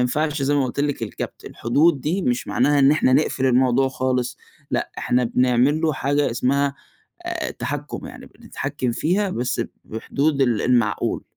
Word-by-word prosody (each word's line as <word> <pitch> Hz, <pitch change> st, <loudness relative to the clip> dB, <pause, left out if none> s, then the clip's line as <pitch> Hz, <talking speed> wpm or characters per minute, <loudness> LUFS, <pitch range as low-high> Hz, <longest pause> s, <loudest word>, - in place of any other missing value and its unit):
ينفعش 145 Hz, +4 st, 0 dB
زي 140 Hz, +2 st, +2 dB
ما 140 Hz, -2 st, +2 dB
قلت 130 Hz, +2 st, -3 dB
لِك 145 Hz, -4 st, -1 dB
الكبّت، 110 Hz, -, -6 dB
الحدود 145 Hz, +5 st, +1 dB
دي، 175 Hz, +8 st, -1 dB
مش 125 Hz, -5 st, -1 dB
معناها 145 Hz, +4 st, +2 dB
إن 135 Hz, 0 st, +6 dB
إحنا 150 Hz, -3 st, +3 dB
نقفل 135 Hz, -1 st, +2 dB
الموضوع 130 Hz, +1 st, +3 dB
خالص، 125 Hz, -1 st, -2 dB, 0.3 s
لأ -, -, -1 dB
إحنا 125 Hz, 0 st, +1 dB
بنعمل 125 Hz, +5 st, +2 dB
له 160 Hz, -1 st, +1 dB
حاجة 145 Hz, +1 st, 0 dB
اسمها 140 Hz, +3 st, +1 dB, 0.5 s
آآ، -, -, -3 dB
تحكُم -, -, -5 dB
يعني -, -, -11 dB
بنتحكم 125 Hz, -, -4 dB
فيها 185 Hz, -, 0 dB
بس 125 Hz, -5 st, -1 dB, 0.2 s
بحدود 140 Hz, +6 st, -1 dB
ال 120 Hz, -5 st, +1 dB
المعقول. 120 Hz, -4 st, +1 dB
130 Hz, 160 wpm, -22 LUFS, 125-145 Hz, 0.5 s, إن